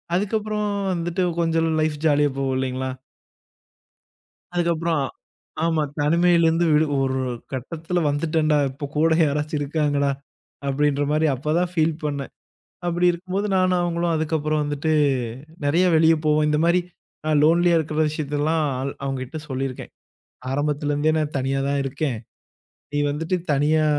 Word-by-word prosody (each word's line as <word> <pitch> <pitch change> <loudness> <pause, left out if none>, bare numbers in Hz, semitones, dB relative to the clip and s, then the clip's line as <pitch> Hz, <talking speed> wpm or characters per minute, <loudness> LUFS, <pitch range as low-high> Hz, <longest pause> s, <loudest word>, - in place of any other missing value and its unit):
அதுக்கப்புறம் 210 +1 -1 0.3
வந்துட்டு 175 +1 -1 0.2
கொஞ்ச 165 -1 +1 0.2
லைஃப் 155 -1 0
ஜாலியா 145 -2 +3
போவும் 135 -1 0
இல்லைங்களா? 130 0 -2 1.7
அதுக்கப்புறோம் 170 -3 +1 0.6
ஆமா. 160 -2 +1 0.2
தனிமையிலந்து 170 +1 +3
விடு 155 +1 +4 0.2
ஒரு 130 0 0 0.3
கட்டத்துல 165 +7 -3
வந்துட்டேன்டா. 155 0 +1
இப்ப 140 +2 -6
கூட 160 +2 +3
யாராச்சும் 150 +1 -1
இருக்காங்கடா! 145 -1 0 0.6
அப்டின்ற 145 +1 +1
மாரி 155 +1 +2
அப்பதா 150 +6 0
ஃபீல் 160 -2 +2
பண்ணேன். 140 -2 -3 0.6
அப்டி 175 +1 +1
இருக்கும்போது 185 +4 -3
நானும், 185 -1 +2
அவங்களும் 170 -1 0
அதுக்கப்புறம் 155 -1 0
வந்துட்டு 145 +2 -1 0.7
நறைய 165 +6 +3
வெளிய 160 +1 +5
போவோம். 150 0 +3
இந்த 150 0 +2
மாரி 175 +2 +4 0.5
அ - - +2
லோன்லியா 170 +2 +4
இருக்க 155 -1 -3
விஷயத்தயெல்லாம் 155 +1 0 0.2
அவ் 140 - -2
அவங்ககிட்ட 135 +2 -4
சொல்லிருக்கேன். 130 -1 -4 0.6
ஆரம்பத்துல 145 +1 -1
இருந்தே 155 +2 +2
நான் 150 -2 -2
தனியா 135 +1 0
தான் 140 0 0
இருக்கேன். 135 -1 -2 0.8
நீ 145 - -1
வந்துட்டு 160 +5 -1 0.2
தனியா 155 +2 +2
155 Hz, 125 wpm, -23 LUFS, 145-170 Hz, 1.7 s, வெளிய